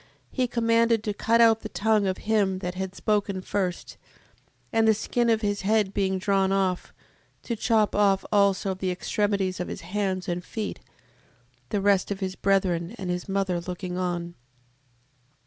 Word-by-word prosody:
He 255 -2 0
commanded 230 -1 +2
to 210 - -2
cut 230 +3 +2
out 225 -1 +6
the - - -7
tongue 215 -1 +1
of 185 - -1
him 205 -3 +2
that 180 -1 -4
had 190 0 -5
spoken 205 -3 0
first: 185 -3 -3 0.8
and 225 0 +3
the 220 - +5
skin 235 +2 0
of 225 -1 +2
his 205 -1 -1
head 205 0 +1
being 190 -1 0
drawn 195 0 +1
off, 190 -2 0 0.5
to 235 - -3
chop 220 -1 +2
off 200 -2 +3
also 200 -1 +2
the 185 0 -3
extremities 190 0 -1
of 180 - -3
his - - -6
hands 190 -2 -2
and 175 0 -2
feet, 215 +2 -5 0.9
the 205 - -1
rest 200 -1 +3
of 200 -1 -3
his 190 -1 -3
brethren 185 -1 0
and 185 -4 -3
his 180 +2 -4
mother 190 -3 0
looking 180 +1 -5
on. 175 -1 -2
195 Hz, 165 wpm, -26 LUFS, 185-215 Hz, 0.9 s, out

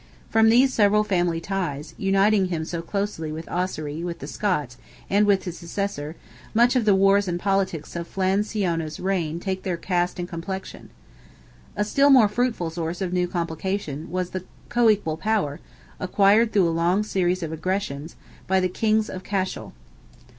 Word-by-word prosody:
From 225 0 +5
these 260 +3 +5
several 210 0 +4
family 175 -5 0
ties, 165 -6 -3
uniting 195 0 +3
him 165 -3 -3
so 170 0 -4
closely 195 -4 -3
with 160 +1 -6
Ossory, 165 -3 -3
with 175 -1 -4
the - - -8
Scots, 150 - -2 0.3
and 205 +1 +4
with 200 -2 +3
his 175 -2 -6
successor, 170 -3 -4 0.4
much 240 +3 +4
of 245 -3 +2
the 205 -2 +5
wars 195 +1 +4
and 175 -1 -1
politics 195 -5 -1
of 170 0 -4
Flan 190 +1 +1
Siona's 170 -8 -2
reign 175 -4 -1
take 190 0 -3
their 180 -3 -2
cast 175 0 -1
and 175 -1 -4
complexion. 180 +3 -6 0.9
A 210 - +1
still 275 +6 +3
more 255 -6 +7
fruitful 210 -6 -1
source 165 +1 -4
of 185 -2 -2
new 180 -1 +1
complications 170 -2 -3
was 180 +1 -2
the 185 -1 -4 0.3
co 240 -2 +4
equal 195 -7 +1
power, 190 -7 -1 0.4
acquired 205 +4 +4
through 195 -5 +3
a - - +1
long 170 +5 +2
series 185 -3 0
of 160 - -4
aggressions, 160 -3 -3 0.3
by 190 0 +3
the 185 0 +1
kings 215 +3 +1
of 185 0 -7
Cashel. 190 -2 -3
185 Hz, 170 wpm, -24 LUFS, 170-205 Hz, 0.9 s, more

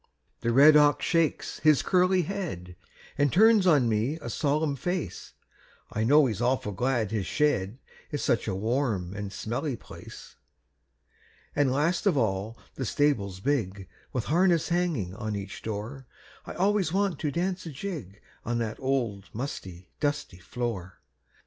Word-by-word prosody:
The 120 - 0
red 145 +5 +7
ox 145 -1 +4
shakes 165 -2 0
his 155 -3 +4
curly 185 0 +3
head, 150 - -5 0.4
An' 145 0 +4
turns 215 - +5
on 145 -8 +5
me 115 +7 0
a 120 -6 -6
solemn 150 +1 0
face; 175 - -4 0.6
I 110 - -1
know 145 +5 +6
he's 115 -3 -2
awful 125 -3 0
glad 120 0 0
his 105 -4 -2
shed 125 -8 0 0.3
Is 145 - -3
such 115 - +1
a 95 - -1
warm 110 -4 -1
and 100 -1 -5
smelly 120 +7 -3
place. 70 -10 -12 1.2
An' 145 -2 +3
last 155 +9 +1
of 175 -7 +3
all 110 -1 -1 0.2
the 135 - -4
stable 140 -9 +1
big, 100 -9 -1 0.2
With 125 - -2
harness 175 +1 +2
hanging 170 - 0
on 110 0 -4
each 100 0 -6
door, 115 +5 -6 0.4
I - - -6
always 195 -3 +1
want 195 -4 0
to 150 - -1
dance 180 +2 -2
a - - -5
jig 135 - -7 0.2
On 120 +1 -1
that 115 -2 -3
old 120 -7 -1
musty, 95 -8 -6
dusty 145 - -2
floor. 100 -2 -5
130 Hz, 150 wpm, -27 LUFS, 105-155 Hz, 1.2 s, red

